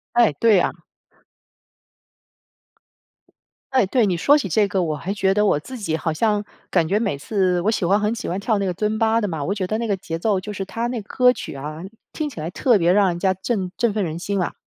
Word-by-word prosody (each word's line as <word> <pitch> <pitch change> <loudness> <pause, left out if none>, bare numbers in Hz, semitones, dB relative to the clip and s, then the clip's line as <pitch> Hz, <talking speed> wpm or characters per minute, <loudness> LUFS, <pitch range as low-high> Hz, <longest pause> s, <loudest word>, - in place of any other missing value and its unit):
哎， 235 -9 +5
对 215 +4 +4
啊。 - - +1 3.0
哎， 255 -7 +3
对， 240 +4 +2
你 180 -3 0
说 285 - +5
起 250 -11 -2
这 205 +4 +3
个， 190 -2 0
我 155 -3 -1
还 185 +7 -4
觉 195 -1 +2
得 210 +1 +2
我 145 - +3
自 255 - -9
己 160 -7 -2
好 160 0 -2
像 210 +4 +1 0.2
感 170 -3 +2
觉 200 +5 +1
每 205 -10 -1
次 185 +3 0
我 215 - +2
喜 190 -6 0
欢 200 +3 +3
很 210 +2 0
喜 235 - -5
欢 180 - -2
跳 210 +1 0
那 200 - -1
个 180 - -1
尊 215 +3 -1
巴 225 0 +3
的 220 - 0
嘛， 160 -5 -4
我 200 - -1
觉 195 -3 -2
得 215 +4 -2
那 230 0 -2
个 200 - +1
节 165 -3 -5
奏 200 +2 +1
就 210 +3 -7
是 195 -1 -5
它 230 +4 -3
那 240 -2 -3
歌 250 +4 +3
曲 - - -7
啊， 150 +3 -6 0.3
听 310 -2 -3
起 275 - -10
来 155 +2 -4
特 240 +5 +3
别 170 0 +3
让 200 0 +4
人 175 - -2
家 190 +1 +2
振 190 -1 -3
振 230 -3 +1
奋 210 - 0
人 160 -1 -4
心 200 +3 -2
啊， - - -2
200 Hz, 260 characters per minute, -22 LUFS, 175-220 Hz, 3.0 s, 哎